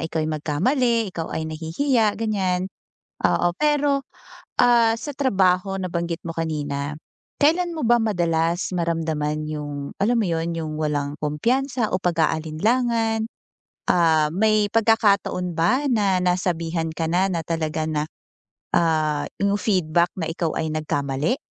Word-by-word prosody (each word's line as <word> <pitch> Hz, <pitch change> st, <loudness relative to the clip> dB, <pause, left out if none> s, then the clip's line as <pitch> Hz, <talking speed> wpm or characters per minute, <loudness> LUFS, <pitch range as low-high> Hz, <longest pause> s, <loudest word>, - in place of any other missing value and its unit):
ikaw 160 Hz, -1 st, -2 dB
ay 155 Hz, -, -2 dB
magkamali, 225 Hz, -, +1 dB
ikaw 165 Hz, -2 st, -4 dB
ay 160 Hz, -, -2 dB
nahihiya 205 Hz, -, 0 dB
ganiyan, 190 Hz, -4 st, -1 dB, 0.5 s
oo. 175 Hz, -, +3 dB
Pero, 290 Hz, -2 st, +2 dB, 0.6 s
ah, 235 Hz, -2 st, +5 dB
sa 290 Hz, +6 st, -5 dB
trabaho 195 Hz, -7 st, +2 dB
nabanggit 170 Hz, -2 st, -3 dB
mo 165 Hz, -, -4 dB
kanina, 145 Hz, -3 st, -3 dB, 0.5 s
kailan 345 Hz, +4 st, +3 dB
mo 305 Hz, -, -2 dB
ba 240 Hz, -, +5 dB
madalas 170 Hz, -3 st, 0 dB
maramdaman 160 Hz, -3 st, -1 dB
'yung, 145 Hz, -2 st, -5 dB
alam 235 Hz, +4 st, +3 dB
mo 220 Hz, -, +1 dB
'yun, 165 Hz, 0 st, -1 dB
'yung 155 Hz, -1 st, -4 dB
walang 145 Hz, -2 st, -1 dB
kumpiyansa 240 Hz, -, 0 dB
o 185 Hz, -, 0 dB
pag-aalinlangan, 220 Hz, +8 st, +1 dB, 0.7 s
ah, 160 Hz, -3 st, +3 dB
may 215 Hz, +1 st, +2 dB
pagkakataon 200 Hz, -6 st, +2 dB
ba 255 Hz, -, +2 dB
na 200 Hz, -5 st, +2 dB
nasabihan 170 Hz, -2 st, 0 dB
ka 165 Hz, 0 st, -2 dB
na 185 Hz, +2 st, +3 dB
na 170 Hz, -3 st, -1 dB
talaga 160 Hz, -1 st, -2 dB
na, 150 Hz, -1 st, 0 dB, 0.7 s
ah, 155 Hz, -3 st, +1 dB, 0.2 s
'yung 200 Hz, 0 st, +2 dB
feedback 175 Hz, -4 st, +2 dB
na 165 Hz, -, -2 dB
ikaw 165 Hz, -1 st, -1 dB
ay 160 Hz, -, -1 dB
nagkamali? 145 Hz, -, -1 dB
175 Hz, 130 wpm, -23 LUFS, 160-220 Hz, 0.7 s, ah